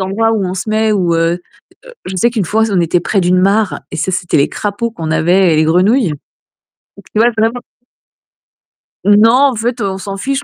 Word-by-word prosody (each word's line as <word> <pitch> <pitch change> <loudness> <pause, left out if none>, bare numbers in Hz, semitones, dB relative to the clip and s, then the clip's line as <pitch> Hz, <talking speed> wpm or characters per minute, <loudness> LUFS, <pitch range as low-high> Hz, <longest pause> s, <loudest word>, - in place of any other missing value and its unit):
endroits 210 +4 0
où 210 -3 -1
on 180 - -4
se 190 +3 -5
met, 220 0 +1
où, 175 -4 0
heu 165 +1 0 0.5
heu - - -13
je 185 0 -5
sais 235 +7 +2
qu'une 220 -5 -2
fois, 220 +4 +1
on 185 -3 +1
était 170 +1 +1
près 195 +3 0
d'une 180 +1 +2
mare 195 -6 +1
et - - -6
ça 190 - -2
c'était 180 -1 -1
les 140 - +2
crapauds 210 +3 -3
qu'on 160 -6 -5
avait 175 +2 +2
et - - +2
les 155 - +3
grenouilles. 190 +8 +2 0.9
Et - - -12
puis, 215 - -2
ouais, 240 - +3
vraiment. 225 +3 0 1.5
Non, 210 +3 +5
en 265 -1 +3
fait, 235 +2 -3
on 195 -1 -2
s'en 195 0 -6
fiche, 275 +6 -3
200 Hz, 215 wpm, -14 LUFS, 180-225 Hz, 1.5 s, Non